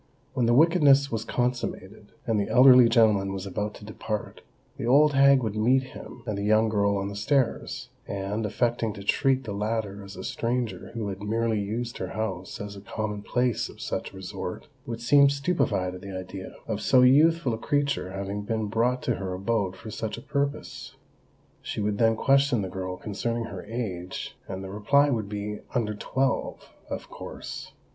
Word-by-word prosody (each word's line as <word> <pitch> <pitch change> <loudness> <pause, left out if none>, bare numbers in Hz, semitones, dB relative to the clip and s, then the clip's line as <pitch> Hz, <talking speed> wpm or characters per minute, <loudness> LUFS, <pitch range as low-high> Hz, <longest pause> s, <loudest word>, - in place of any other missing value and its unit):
When 120 -2 +1
the 120 - +4
wickedness 145 -3 +5
was 110 -1 -2
consummated, 115 -4 -3
and 115 -4 +1
the 100 - -1
elderly 125 -2 +8
gentleman 105 -5 +3
was 95 0 -5
about 105 +2 -3
to 105 - -11
depart, 110 0 -5 0.4
the - - -4
old 145 +4 +5
hag 140 -1 +6
would 110 -2 -2
meet 125 +5 +3
him 120 - -10
and 105 -4 -2
the - - -3
young 110 +1 +4
girl 100 -1 +2
on 100 0 -2
the 100 - -6
stairs, 130 +4 0 0.2
and, 100 +2 -3
affecting 115 +1 0
to 100 -1 -9
treat 135 +5 +2
the 105 - -5
latter 105 -1 -2
as 100 0 -10
a 95 - -7
stranger 120 +2 -2
who 110 -3 -2
had 95 0 -6
merely 110 +1 0
used 115 +4 -4
her - - -4
house 95 -5 -4
as 100 0 -6
a 100 - -9
common 105 0 -4
place 125 +2 0
of - - -14
such - - -4
resort, 95 -1 -6 0.2
would 115 0 -5
seem 140 +3 +6
stupefied 140 - 0
at 90 - -9
the 95 -1 -6
idea 95 +1 -8
"of 110 -2 -2
so 125 -1 +5
youthful 150 +1 +5
a - - -2
creature 140 -7 0
having 100 +1 -4
been 110 +1 -2
brought 120 +4 0
to 120 - 0
her 95 -2 -4
abode 100 -1 -1
for 110 +4 -9
such 110 0 -4
a - - -8
purpose." 140 0 -3 0.7
She - - -5
would 105 0 -1
then 115 -1 +4
question 135 -2 +3
the 95 - -4
girl 95 0 -5
concerning 115 +4 -3
her 115 - -7
age; 95 -7 -5
and 95 0 -5
the 95 - -7
reply 140 +8 +3
would 110 -5 -1
be 105 0 -4 0.2
"under 110 -3 0
twelve" 130 +5 -2 0.2
of - - -5
course. - - -8
110 Hz, 185 wpm, -27 LUFS, 100-125 Hz, 0.7 s, elderly